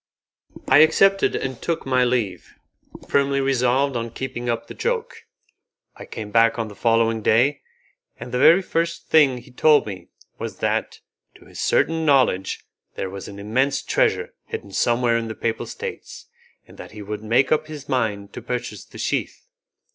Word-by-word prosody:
I 135 - +6
accepted 195 +5 +4
and 130 -3 -4
took 170 -1 -2
my 130 -1 +2
leave, 120 -6 -2 0.5
firmly 140 0 +2
resolved 135 0 +1
on 115 0 -2
keeping 120 0 -5
up 115 0 -2
the - - -10
joke. 475 -2 -3 0.7
I - - -10
came 105 -2 -7
back 115 +1 +4
on 115 -2 -3
the 105 - -12
following 115 0 +2
day, 125 +7 +2 0.6
and 125 - -8
the 125 - -1
very 170 +7 +6
first 170 -1 -2
thing 145 -5 +5
he 125 +2 -13
told 150 +4 +4
me 100 -3 -8 0.3
was - - -5
that, - - -2 0.3
to - - -18
his - - -12
certain 165 +1 +1
knowledge, 130 -11 +2 0.3
there 95 - -4
was 100 0 -7
an 100 - -9
immense 130 +7 0
treasure - - 0
hidden 450 -1 -7
somewhere 120 0 +2
in 115 -1 -3
the 110 - -6
Papal 115 -1 -3
States, - - -8 0.4
and - - -17
that - - -10
he 105 -1 -8
would 105 +1 -6
make 120 +5 +2
up 155 0 +2
his 150 -2 -9
mind 105 -6 -2
to - - -7
purchase 120 -5 -5
the - - -14
sheath. - - -3
125 Hz, 170 wpm, -22 LUFS, 115-145 Hz, 0.7 s, I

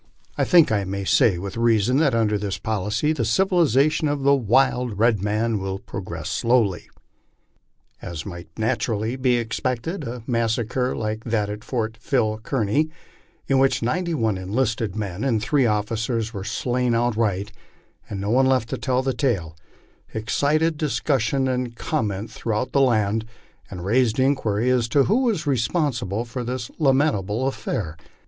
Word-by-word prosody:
I - - +1
think 170 -8 +5
I 105 -2 +1
may 100 +1 -4
say 95 -1 +4
with 100 +4 -6
reason, 115 +1 +3
that 145 -5 +3
under 110 -2 +2
this 100 -1 -2
policy 110 +8 -1
tbo 135 -7 -2
civilization 155 - +2
of 145 -1 -1
the 140 +1 +5
wild 125 -2 +2
red 110 -2 +3
man 110 +2 0
will 95 0 -3
progress 85 -5 -7
slowly." 115 -7 +1 1.1
As 80 -2 -6
might 85 -3 -8
naturally 110 +1 -1
be 130 -1 +2
expected, 125 - -2
a 120 0 -6
massacre 120 +1 0
like 110 0 -3
that 105 -3 0
at 105 +1 -7
Fort 110 -2 -3
Phil 110 -2 0
Kearny, 130 +5 0 0.6
in 135 -1 +2
which 135 -3 +2
ninety 170 +8 0
one 110 -7 0
enlisted 110 +1 -1
men 100 -1 -4
and 125 -5 +1
three 125 +4 +2
officers 110 +2 -1
were 100 -3 -5
slain 125 +3 0
outright, 110 -4 0 0.6
and 100 - -4
no 100 +2 -2
one 130 +2 +4
left 130 -4 +1
to - - -3
tell 130 -1 0
the 135 0 0
tale, 95 - -1 0.6
excited 150 +8 +1
discussion 135 -3 0
and 125 -2 -2
comment 105 -2 -2
throughout 110 +2 -2
the 140 - +3
land, 110 -4 +2 0.5
and 90 -1 -7
raised 115 +2 +2
inquiry 125 -5 +1
as 125 -2 +2
to 140 +1 +4
who 235 - +2
was 205 -9 0
responsible 120 - 0
for 120 +1 -5
this 120 0 -4
lamentable 130 - +2
affair. 80 -11 -3
115 Hz, 155 wpm, -23 LUFS, 105-130 Hz, 1.1 s, think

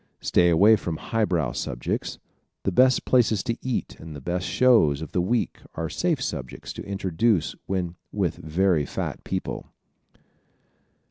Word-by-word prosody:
Stay 85 0 +3
away 100 +7 +6
from 85 -6 -4
highbrow 90 - 0
subjects. - - -3 0.5
The 95 - 0
best 130 +6 +4
places 115 -5 +3
to 115 0 -2
eat 130 -2 -3
and 80 -2 -9
the - - -7
best 90 +6 -2
shows 110 - +4
of 80 - -8
the 90 - +1
week 115 +6 0 0.2
are 80 0 -3
safe 170 -5 0
subjects 70 - -5
to - - -7
introduce 95 0 +1
when 90 -2 -2 0.2
with 95 -6 -1
very 80 -1 +1
fat - - -4
people. - - -4
90 Hz, 145 wpm, -25 LUFS, 80-110 Hz, 0.5 s, away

